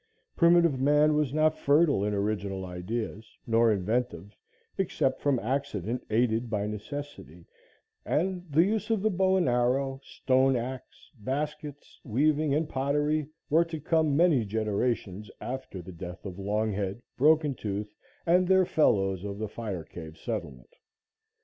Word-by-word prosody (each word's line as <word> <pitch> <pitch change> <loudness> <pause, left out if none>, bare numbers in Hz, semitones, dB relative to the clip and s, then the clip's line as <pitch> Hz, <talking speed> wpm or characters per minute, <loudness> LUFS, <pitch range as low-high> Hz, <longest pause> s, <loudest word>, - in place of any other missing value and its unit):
Primitive 170 -5 +4
man 150 +3 +4
was 150 -3 +1
not 155 +1 +2
fertile 145 - +3
in 105 - 0
original 100 -2 -2
ideas, 110 +5 -5
nor 115 0 +3
inventive, 100 -1 -2 0.4
except 135 -8 0
from 140 -3 +2
accident 120 -2 -2
aided 115 +1 +1
by 105 -2 -1
necessity, 105 - -7 0.6
and 180 +2 -1
the 155 +3 +4
use 210 +3 -1
of 220 -3 +1
the 220 - +2
bow 190 0 +2
and 180 - +2
arrow, 130 +2 +1
stone 130 0 +2
axe, 125 +2 -6
baskets, 145 +4 -5
weaving 150 +5 +1
and 150 +2 +1
pottery 145 +2 0 0.2
were 165 +2 +4
to 165 -2 -6
come 155 -1 +1
many 165 -8 +4
generations 105 -1 -2
after 125 -8 -6
the 95 - -9
death 90 +2 -9
of 95 -1 -7
Longhead, 105 +1 -2
Broken 150 +1 +4
Tooth 105 -2 -5 0.3
and 180 +2 +4
their 190 0 +5
fellows 95 - +2
of 100 -1 -5
the 110 +1 -3
fire 100 -5 -5
cave 80 -1 -10
settlement. 65 -6 -6
125 Hz, 140 wpm, -28 LUFS, 105-150 Hz, 0.6 s, their